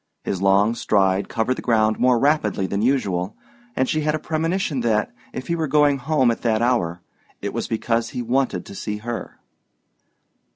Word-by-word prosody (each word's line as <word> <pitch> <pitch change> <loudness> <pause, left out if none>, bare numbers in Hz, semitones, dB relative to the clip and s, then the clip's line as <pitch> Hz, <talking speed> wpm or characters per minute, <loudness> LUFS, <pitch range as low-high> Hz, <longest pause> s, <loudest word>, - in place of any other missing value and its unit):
His 95 - -3
long 100 +3 +4
stride 95 -4 +1
covered 115 +3 0
the - - -5
ground 110 -2 +2
more 125 -1 +4
rapidly 125 -8 +1
than 100 +2 -2
usual, 105 -7 0 0.4
and 130 - +1
she 155 - 0
had 150 0 +1
a - - 0
premonition 165 0 -1
that, 110 -3 +1 0.2
if 130 - -6
he 170 - -1
were 160 -2 -1
going 145 -1 +3
home 130 -2 +2
at 115 - -4
that 115 -1 +1
hour, 90 -9 0 0.4
it - - -4
was - - -3
because 115 +1 -1
he 125 - -4
wanted 120 -6 0
to - - -10
see 105 +1 -4
her. 115 +2 -6
120 Hz, 180 wpm, -22 LUFS, 105-140 Hz, 0.4 s, long